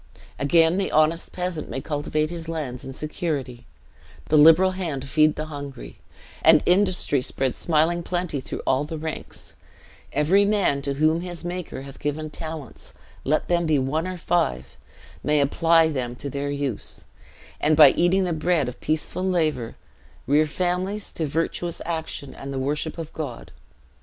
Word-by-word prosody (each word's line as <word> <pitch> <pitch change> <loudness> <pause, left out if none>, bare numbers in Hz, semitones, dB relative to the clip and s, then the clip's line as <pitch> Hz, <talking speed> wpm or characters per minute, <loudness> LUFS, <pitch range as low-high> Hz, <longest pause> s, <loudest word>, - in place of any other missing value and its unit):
Again 165 +4 +4
the 195 - -1
honest 155 +2 +2
peasant 180 -3 -4
may - - -3
cultivate 155 +2 -2
his 165 -1 -6
lands 140 -7 -4
in 135 - -7
security, 135 -4 -4 0.6
the 155 - +3
liberal 165 +5 +7
hand 160 -8 -4
feed 155 +2 +3
the 155 - -4
hungry, 140 - -8 0.4
and - - +6
industry 180 -7 +2
spread 130 0 0
smiling 165 +1 +1
plenty 175 -4 -2
through - - -6
all 135 +2 +2
ranks; 155 0 -6 0.6
every 175 +7 +3
man 200 -9 +2
to 140 0 -2
whom 155 +3 +2
his 175 -1 -6
Maker 175 -6 -5
hath 135 0 -11
given 150 +1 -3
talents, 155 -5 -7 0.3
let 155 +3 0
them 170 -1 +1
be 155 -2 +3
one 150 +6 -1
or 185 -1 -4
five, 70 - -1 0.5
may 150 0 +2
apply 165 +3 +4
them 125 -5 -3
to 140 +2 -6
their 140 +1 -3
use; 140 -5 -3 0.5
and, 155 0 +2
by 150 -4 +9
eating 185 +2 +2
the 180 -2 -1
bread 160 -3 +1
of 125 - -7
peaceful 155 +4 -1
labor, 155 -10 0 0.5
rear 150 +4 +3
families 185 +5 -2
to 160 - -3
virtuous 165 +3 -2
action 160 -4 -4
and 135 0 -8
the 135 - -4
worship 150 +5 -2
of 165 -1 -7
God. 140 -7 -6
155 Hz, 155 wpm, -24 LUFS, 140-170 Hz, 0.6 s, by